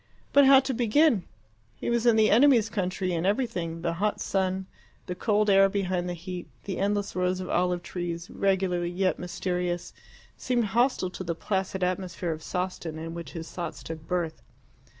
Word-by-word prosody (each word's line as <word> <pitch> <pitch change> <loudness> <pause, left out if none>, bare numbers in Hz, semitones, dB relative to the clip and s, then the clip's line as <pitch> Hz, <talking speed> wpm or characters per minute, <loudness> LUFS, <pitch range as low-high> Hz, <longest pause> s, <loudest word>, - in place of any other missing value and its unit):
But 285 -1 +7
how 270 -1 +9
to 265 0 -2
begin? 240 - +3 0.5
He - - -3
was 235 0 +1
in 235 - +6
the 220 -1 +4
enemy's 235 -2 +5
country, 185 -2 -1
and 165 -1 -1
everything 180 -6 -1
the 170 -1 0
hot 210 0 +1
sun, 190 0 -1 0.4
the 180 - -3
cold 210 +3 +1
air 195 -1 +6
behind 185 -3 -1
the 175 - -3
heat, 180 +1 -7 0.2
the 190 -2 -4
endless 205 0 0
rows 180 0 0
of 185 - -5
olive 180 0 +1
trees, 175 -2 -4
regular 190 -3 +1
yet 180 +2 0
mysterious 180 0 -3 0.4
seemed 245 -3 0
hostile 240 -6 +2
to 185 - -6
the 170 -2 -2
placid 190 +1 -2
atmosphere 180 -1 -2
of 155 0 -5
Sawston 180 -2 -4
in 165 +1 -6
which 170 -5 -7
his 165 -1 -7
thoughts 170 -3 -5
took 160 -1 -8
birth. 175 -3 -2
185 Hz, 175 wpm, -27 LUFS, 175-205 Hz, 0.5 s, how